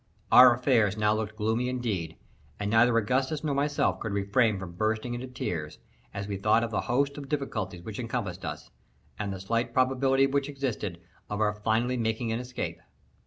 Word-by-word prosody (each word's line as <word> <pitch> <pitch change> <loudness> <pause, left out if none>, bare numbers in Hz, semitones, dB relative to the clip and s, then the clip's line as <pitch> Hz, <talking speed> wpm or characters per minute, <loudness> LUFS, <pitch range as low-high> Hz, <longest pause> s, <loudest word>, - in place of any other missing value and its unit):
Our 125 -1 +9
affairs 115 -5 +2
now 105 0 +3
looked 110 0 -3
gloomy 110 +3 0
indeed, 105 -10 -2 0.4
and 105 0 -2
neither 115 +1 +5
Augustus 130 +7 0
nor 150 -2 0
myself 145 +1 +1
could 110 -3 -4
refrain 100 +2 +2
from 95 -2 -7
bursting 110 +6 -1
into 120 +2 -5
tears, 80 -11 -4 0.3
as 100 0 -5
we 100 -1 -3
thought 110 +4 +3
of 115 - -3
the 105 - 0
host 140 +3 +1
of 140 -2 -9
difficulties 105 - -3
which 105 +4 -7
encompassed 115 -6 -3
us, 75 -4 -6 0.5
and 100 -2 -2
the 95 - -5
slight 115 +5 -1
probability 135 +1 +3
which 140 +1 0
existed 120 -10 -3 0.3
of 105 - -3
our 105 -1 +2
finally 110 +4 0
making 115 0 -1
an 115 - -1
escape. 125 0 -5
115 Hz, 180 wpm, -28 LUFS, 100-125 Hz, 0.5 s, Our